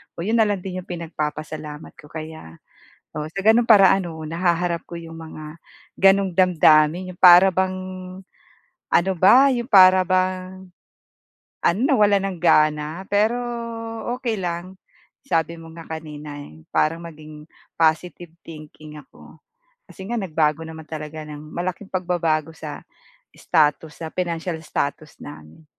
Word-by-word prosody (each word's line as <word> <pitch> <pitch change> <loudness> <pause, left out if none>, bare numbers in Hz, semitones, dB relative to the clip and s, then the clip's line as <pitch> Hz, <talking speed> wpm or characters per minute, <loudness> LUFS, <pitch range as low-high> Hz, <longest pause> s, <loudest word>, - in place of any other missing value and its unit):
oo 170 - -5
yun 225 +3 +1
na 220 - +4
lang 205 -2 -1
din 185 -1 -5
yung - - -28
pinagpapasalamat 155 -2 -6
ko 150 - -14
kaya, 155 - -9 0.6
oo 150 0 -4
sa 195 - -4
ganong 230 +2 +4
para 195 -4 +7
ano 175 -4 -2
nahaharap 170 +1 -1
ko 170 - -7
yung 165 -1 -9
mga 155 0 -10 0.4
ganoong 195 -1 +4
damdamin, 175 0 +3
yung 175 - -28
para 180 +1 +8
bang, 185 +1 0 1.1
ano 190 +2 +2
ba, 260 +10 +6
yung 240 -2 -2
para 185 -2 +7
bang, 185 0 -2 1.0
ano 170 +5 +2
na 270 - +2
wala 205 -1 +4
nang 195 -2 -4
gana 155 0 +2
pero 215 +4 +2 0.8
okey 235 -4 -3
lang 180 +1 -5 0.5
sabi 165 -8 -1
mo 165 0 -12
nga 165 - -10 0.2
kanina 150 -2 -9
eh 80 - -12
parang 165 +2 0
maging 155 -2 -12 0.2
positive 165 +1 0 0.2
thinking 155 -1 -12
ako. 135 - -18 0.5
Kasi 190 - -10
nga 235 - -5
nagbago 160 -5 0
naman 160 -1 -10
talaga 155 0 -7
ng 150 -1 -9
malaking 185 +3 -4
pagbabago 170 -4 -1
sa 155 -2 -8 0.5
status 150 0 0
sa 160 - -4
financial 170 -1 -3
status 150 0 -4
namin. 75 - -12
170 Hz, 140 wpm, -22 LUFS, 155-185 Hz, 1.1 s, para